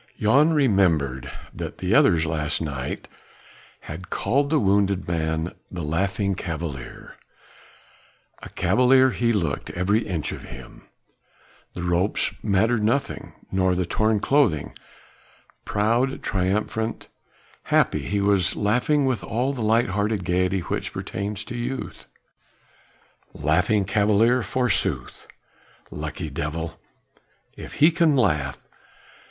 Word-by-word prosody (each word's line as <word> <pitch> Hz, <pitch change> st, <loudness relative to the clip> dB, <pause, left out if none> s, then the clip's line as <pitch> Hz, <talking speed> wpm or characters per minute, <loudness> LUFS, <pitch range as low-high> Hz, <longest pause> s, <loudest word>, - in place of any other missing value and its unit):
Jan 140 Hz, +9 st, +4 dB
remembered 85 Hz, -, +2 dB, 0.2 s
that -, -, -6 dB
the -, -, -1 dB
others 80 Hz, -1 st, +4 dB
last 75 Hz, -2 st, -1 dB
night 70 Hz, -5 st, -4 dB, 0.7 s
had 80 Hz, +4 st, -9 dB
called 140 Hz, +3 st, 0 dB
the 155 Hz, -, +3 dB
wounded 100 Hz, -2 st, +1 dB
man 80 Hz, 0 st, -1 dB, 0.2 s
the 85 Hz, -3 st, -6 dB
Laughing 95 Hz, +5 st, 0 dB
Cavalier. 80 Hz, -7 st, -6 dB, 1.2 s
A -, -, -9 dB
Cavalier 125 Hz, +8 st, +4 dB
he 120 Hz, -1 st, +1 dB
looked, 85 Hz, -, -1 dB
every 95 Hz, +5 st, +1 dB
inch 85 Hz, -6 st, -2 dB
of -, -, -8 dB
him; 65 Hz, -1 st, -12 dB, 0.9 s
the 85 Hz, -, -6 dB
ropes 90 Hz, +3 st, 0 dB
mattered 110 Hz, +3 st, +2 dB
nothing, 135 Hz, +6 st, -1 dB, 0.2 s
nor 95 Hz, -1 st, +2 dB
the 90 Hz, 0 st, 0 dB
torn 110 Hz, +4 st, +1 dB
clothing; 130 Hz, -, +1 dB, 0.9 s
proud, 115 Hz, +6 st, 0 dB
triumphant, 105 Hz, +4 st, -1 dB, 0.6 s
happy, -, -, +2 dB
he 100 Hz, 0 st, -2 dB
was 100 Hz, -3 st, +3 dB
laughing 125 Hz, +8 st, +1 dB
with 130 Hz, -6 st, -1 dB
all 125 Hz, +5 st, -1 dB
the 125 Hz, -, -5 dB
light 115 Hz, +2 st, +2 dB
hearted 105 Hz, 0 st, -1 dB
gaiety 90 Hz, +1 st, +1 dB
which -, -, -4 dB
pertains 105 Hz, +1 st, -4 dB
to -, -, -7 dB
youth. 125 Hz, +2 st, -5 dB, 1.3 s
The -, -, -9 dB
Laughing 105 Hz, -2 st, +2 dB
Cavalier 105 Hz, +4 st, +3 dB
forsooth. 120 Hz, 0 st, -1 dB, 0.6 s
Lucky 75 Hz, +1 st, -5 dB
devil! 80 Hz, +4 st, -4 dB, 0.8 s
if -, -, -9 dB
he 155 Hz, +4 st, +5 dB
can 165 Hz, -3 st, +3 dB
laugh! 75 Hz, -, +1 dB
100 Hz, 115 wpm, -24 LUFS, 85-115 Hz, 1.3 s, he